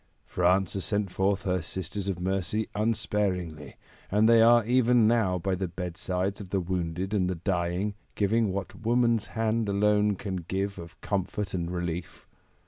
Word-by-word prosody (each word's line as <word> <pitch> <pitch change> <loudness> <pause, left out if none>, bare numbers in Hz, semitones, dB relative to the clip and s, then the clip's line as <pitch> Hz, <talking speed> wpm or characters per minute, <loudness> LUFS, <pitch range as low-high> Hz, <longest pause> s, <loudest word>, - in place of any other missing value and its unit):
France 90 +1 +2
has 95 - -3
sent 105 -2 -1
forth 95 +1 0
her 90 -1 0
Sisters 95 +4 -4
of 95 -3 -2
Mercy 95 +3 -1
unsparingly, 100 -7 -1 0.3
and 105 +2 +3
they 115 -1 +6
are 120 0 +6
even 125 -1 +4
now 110 -6 +2
by 95 +2 -1
the 95 +1 -1
bedsides 90 +3 -3
of 95 - -9
the 95 - 0
wounded 90 +1 -2
and 95 -3 +1
the 95 - -1
dying, 90 +2 -1 0.2
giving 110 +1 +2
what 100 +4 -5
woman's 115 -1 +2
hand 110 -1 +1
alone 105 +1 +2
can 95 0 -4
give 95 +3 -3
of 85 0 -11
comfort 100 +1 -2
and 85 -2 -2
relief. 85 -1 -4
95 Hz, 160 wpm, -28 LUFS, 90-105 Hz, 0.3 s, they